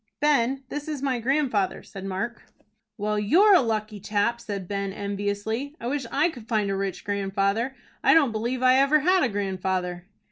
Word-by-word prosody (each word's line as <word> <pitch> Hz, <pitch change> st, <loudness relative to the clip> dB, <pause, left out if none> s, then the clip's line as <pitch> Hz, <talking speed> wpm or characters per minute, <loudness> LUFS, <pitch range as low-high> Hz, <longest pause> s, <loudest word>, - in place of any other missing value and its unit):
"Ben, 275 Hz, -2 st, +2 dB
this 295 Hz, +1 st, -5 dB
is 295 Hz, -3 st, -4 dB
my 260 Hz, -3 st, 0 dB
grandfather," 245 Hz, -6 st, 0 dB
said 195 Hz, -, -10 dB
Mark. 195 Hz, +5 st, -4 dB, 0.6 s
"Well, 210 Hz, 0 st, -1 dB
you're 360 Hz, -, +5 dB
a 370 Hz, -, +7 dB
lucky 215 Hz, -3 st, -2 dB
chap," 210 Hz, +4 st, 0 dB
said 200 Hz, -5 st, -5 dB
Ben, 200 Hz, 0 st, -2 dB
enviously. 205 Hz, +7 st, -3 dB
"I -, -, -8 dB
wish 265 Hz, 0 st, -2 dB
I 305 Hz, +5 st, +2 dB
could 235 Hz, -6 st, -12 dB
find 210 Hz, -3 st, 0 dB
a -, -, 0 dB
rich 195 Hz, -1 st, -3 dB
grandfather. 200 Hz, +5 st, -1 dB, 0.3 s
I -, -, +6 dB
don't 290 Hz, -7 st, +4 dB
believe 240 Hz, +4 st, -2 dB
I 255 Hz, 0 st, +6 dB
ever 280 Hz, +3 st, +4 dB
had 365 Hz, +4 st, +3 dB
a 255 Hz, -, +2 dB
grandfather." 185 Hz, -3 st, -2 dB
220 Hz, 180 wpm, -25 LUFS, 200-270 Hz, 0.6 s, a